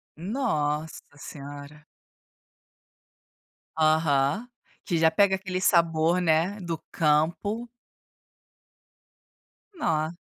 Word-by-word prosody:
Nossa 160 - -2
senhora. 145 +1 -10 1.9
Aham, 155 - +2 0.4
que 175 -5 0
já 160 0 +5
pega 190 +3 +3
aquele 185 -1 -4
sabor, 170 -1 +3
né, 175 +5 +1
do 170 -2 -4
campo. 170 +9 0 2.1
Nossa. 160 - -1
165 Hz, 70 wpm, -26 LUFS, 155-190 Hz, 2.1 s, já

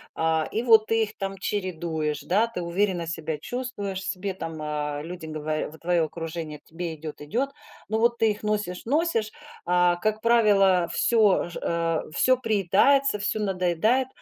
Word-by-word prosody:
Э, 160 -1 +1
и 225 - -1
вот 225 -3 +6
ты 225 0 +2
их 215 0 -7
там 195 -1 -4
чередуешь, 165 -7 -2
да, 205 +10 +2
ты 230 -6 -5
уверенно 175 0 0
себя 160 -1 -3
чувствуешь 205 - -4
себе, 200 -2 -3
э, - - -6
там 150 -4 -4
люди 175 0 -7
говоря 155 0 -3
в 160 - -13
твое 170 0 +1
окружение: 160 -1 -5
"Тебе 165 0 -6
идёт, 155 0 -8
идёт." 240 - -1 0.4
Но 220 +1 0
вот 235 +1 +3
ты 225 -2 +3
их 210 +1 -7
носишь, 210 -4 -2
носишь, 275 -5 +1 0.4
э, 180 0 +3
как 215 +1 0
правило, 200 -6 +4
всё 215 -6 +3
же, 170 - -7
э, 165 -1 0 0.2
всё 255 +6 +4
приедается, 220 +3 +3
всё 205 +2 -1
надоедает. 195 +6 +1
185 Hz, 165 wpm, -25 LUFS, 165-220 Hz, 0.4 s, вот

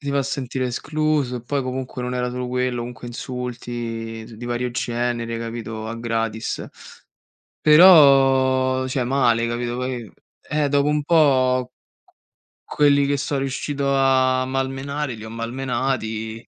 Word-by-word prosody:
Si 140 -2 -4
va 140 - +1
a - - +2
sentire 130 -1 -3
escluso, 150 0 -1
e 120 - -7
poi 140 +3 -2
comunque 130 0 -5
non 125 0 -3
era 125 0 -1
solo 125 0 -4
quello, 125 0 -1
comunque 120 +1 -7
insulti 125 0 -6
di 115 -1 -5
z 115 - -12
di 115 +3 -9
vario 120 +1 -2
genere, 120 -1 -2
capito, 115 -1 -6
a 115 - -4
gratis. 115 -1 -3 0.9
Però 135 -5 +6
cioè, 130 0 -1
male, 120 -3 +2
capito, 120 0 -3
poi 125 -4 -4 0.4
eh, 150 -1 +1
dopo 145 0 +2
un 150 0 +1
po' 130 -6 +3 0.9
q - - -10
quelli 145 -1 +4
che 140 0 +1
'so 140 +2 -2
riuscito 140 +1 -2
a 130 -1 +3
malmenare 135 +1 -3
li 110 0 -10
ho - - -8
malmenati, 115 -2 -3
125 Hz, 150 wpm, -22 LUFS, 120-135 Hz, 0.9 s, Però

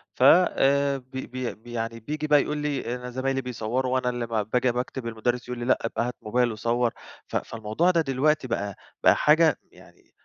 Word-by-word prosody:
ف - - 0
آآ، 140 -3 +4
بي 130 0 -8
بي 125 -1 -4
بي 120 +3 -14
يعني 115 0 -3
بييجي 150 +6 -4
بقى 150 -1 +5
يقول 150 +1 -3
لي: 140 -4 -2
"أنا 125 0 -7
زمايلي 135 +2 -1
بيصوِّروا 125 +1 -2
وأنا 130 -1 +1
اللي 120 -1 -3
ما 115 -2 0
باجي 125 +4 +1
باكتُب، 125 0 -4
المدرِّس 120 +2 -2
يقول 125 -1 -5
لي: 120 - -3
'لأ، 130 - +3
أبقى 115 +1 -1
هات 125 - -5
موبايل 120 +3 +1
وصوّر.'" 115 +2 0 0.4
ف - - -8
فالموضوع 115 +11 0
ده 170 -2 +2
دلوقتي 145 0 +1
بقى 100 -4 -3 0.3
بقى - - +6
حاجة 160 +1 +4
يعني - - -20
125 Hz, 200 wpm, -26 LUFS, 115-140 Hz, 0.4 s, بقى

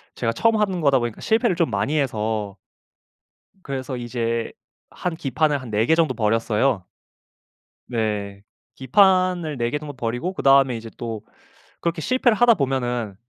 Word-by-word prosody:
제가 115 -2 -1
처음 225 - +2
하는 195 -4 0
거다 140 -5 +3
보니까 120 -2 -4
실패를 220 -4 +2
좀 170 -6 0
많이 125 +10 0
해서 110 -5 -2 1.1
그래서 130 -1 -4
이제 115 -1 -3 0.4
한 180 -2 -4
기판을 150 0 0
한 125 -3 -9
4 110 +2 +1
개 160 - +4
정도 165 -1 +2
버렸어요. 115 0 +1 1.0
네. 105 -4 -3 0.3
기판을 180 +1 +2
4 120 0 0
개 145 - -1
정도 145 -1 -8
버리고 120 +8 -3
그 - - -6
다음에 135 -2 +5
이제 115 0 -8
또 115 -3 -5 0.6
그렇게 170 -1 -2
실패를 255 - +2
하다 240 -1 +6
보면은 125 - -2
130 Hz, 290 characters per minute, -22 LUFS, 115-160 Hz, 1.1 s, 하다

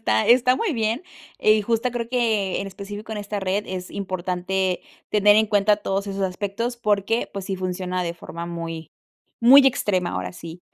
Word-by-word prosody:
está 110 0 +1
está 250 +1 +5
muy 445 -7 -1
bien 225 +5 -1 0.4
y 215 0 +4
justo 230 +3 0
creo 235 -1 -4
que, 220 -6 0
en 195 - -4
específico 205 +3 -8
en 210 - -4
esta 205 0 -4
red 195 +2 -1
es 185 -1 -5
importante 185 -1 -2 0.3
tener 210 0 +5
en 220 - +4
cuenta 205 0 +3
todos 200 -1 -2
esos 195 0 -3
aspectos 205 +6 -2
porque, 210 0 0
pues, 195 -2 -6
sí 195 - -2
funciona 185 0 -2
de 170 -1 -2
forma 170 0 -8
muy 165 -1 -6 0.5
muy 265 +4 +8
extrema, 185 -8 +1
ahora 90 0 -4
sí. 165 - -10
200 Hz, 180 wpm, -23 LUFS, 185-220 Hz, 0.5 s, muy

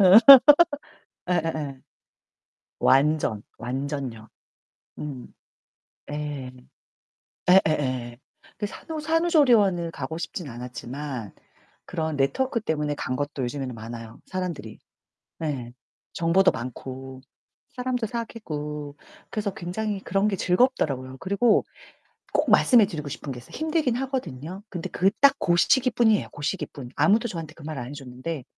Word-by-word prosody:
음. 190 +1 +9 1.1
예예예. 155 -6 -1 1.0
완전, 135 -6 +3
완전요. 130 -2 -4 0.7
음. 135 -5 -7 0.8
예. 145 -3 -4 1.0
예예예예. 130 -9 +2 0.4
그 205 - -2
산후 315 - -7
산후조리원을 275 - +3
가고 160 0 -5
싶진 170 -1 -5
않았지만 125 0 -6 0.5
그런 160 -3 -3
네트워크 230 - +1
때문에 150 -6 -1
간 130 - -3
것도 145 -2 -3
요즘에는 130 0 -3
많아요, 115 0 -9
사람들이. 170 - -5 0.6
네. 130 -7 -4 0.4
정보도 170 +3 +4
많고, 130 +2 -7 0.5
사람도 250 -2 -1
사귀고. 150 - -5 0.3
그래서 205 -2 -2
굉장히 200 +3 -3
그런 195 +2 +1
게 205 - 0
즐겁더라고요. 160 - +1
그리고 200 +4 +2 0.7
꼭 - - +2
말씀해 235 -4 +6
드리고 150 -4 -5
싶은 140 0 -6
게 120 - -9
있어요. 120 - -13
힘들긴 310 -6 0
하거든요. 195 - -4
근데 175 -4 -5
그 190 +2 +2
딱 280 -1 +7
그 175 - +2
시기뿐이에요, 240 -1 +3
그 145 - -9
시기뿐. 145 -7 -4
아무도 220 +4 +3
저한테 165 -6 -6
그 165 - -14
말 155 -1 -5
안 120 - -5
해 145 - -8
줬는데. 135 +2 -6
155 Hz, 280 characters per minute, -25 LUFS, 130-200 Hz, 1.1 s, 음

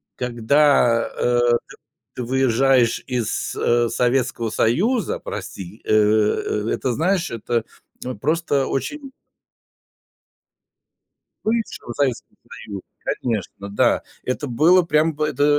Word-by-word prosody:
Когда, 125 0 +3
э, 120 0 +2 0.3
ты - - -13 0.4
ты 125 - -4
выезжаешь 130 -1 +2
из, 125 -5 -2
э, 120 0 +2
Советского 125 -1 0
Союза, 205 - +1
прости, 95 +3 -7
э, - - +1 0.8
это, 130 - -1
знаешь, 175 +6 0
это 115 0 -2 0.6
просто 150 -2 +1
очень 275 - -4 2.3
Бывшего 220 - -2
Советского 135 -3 -2 0.3
Союза, 100 -3 -6 0.4
конечно. 100 -4 -3
Да, 100 - +2 0.2
это 130 +3 -2
было 165 +9 +5
прям 160 -1 +2
бы 150 +1 -1
это, 145 0 0
130 Hz, 100 wpm, -21 LUFS, 115-155 Hz, 2.3 s, было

